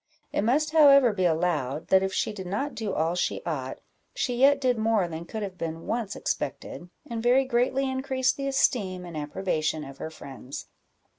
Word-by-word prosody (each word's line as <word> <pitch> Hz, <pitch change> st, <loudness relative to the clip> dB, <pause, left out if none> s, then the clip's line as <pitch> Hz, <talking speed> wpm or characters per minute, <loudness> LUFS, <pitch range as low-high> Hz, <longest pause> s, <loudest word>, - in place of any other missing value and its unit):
It -, -, +1 dB
must 290 Hz, +8 st, +1 dB
however 280 Hz, -6 st, +7 dB
be 185 Hz, -2 st, 0 dB
allowed, 160 Hz, -4 st, 0 dB
that 190 Hz, 0 st, +5 dB
if 190 Hz, 0 st, -1 dB
she 215 Hz, -, -1 dB
did 190 Hz, -3 st, -7 dB
not 260 Hz, +10 st, -2 dB
do 220 Hz, -3 st, -3 dB
all 165 Hz, 0 st, 0 dB
she 180 Hz, -, -1 dB
ought, 135 Hz, -6 st, -3 dB, 0.4 s
she 250 Hz, -, -1 dB
yet 280 Hz, +2 st, +5 dB
did 250 Hz, -4 st, +1 dB
more 220 Hz, -4 st, +2 dB
than 165 Hz, 0 st, -6 dB
could 215 Hz, +4 st, -5 dB
have 190 Hz, -2 st, -7 dB
been 165 Hz, 0 st, -4 dB
once 225 Hz, -4 st, -2 dB
expected, 175 Hz, -, -4 dB, 0.2 s
and 230 Hz, -3 st, -4 dB
very 250 Hz, +3 st, +4 dB
greatly 260 Hz, +2 st, +1 dB
increased 260 Hz, 0 st, 0 dB
the 275 Hz, -1 st, -3 dB
esteem 205 Hz, -9 st, +1 dB
and 170 Hz, -2 st, -9 dB
approbation 155 Hz, 0 st, -2 dB
of 135 Hz, -1 st, -10 dB
her -, -, -4 dB
friends. 135 Hz, -3 st, -9 dB
200 Hz, 190 wpm, -27 LUFS, 165-260 Hz, 0.4 s, however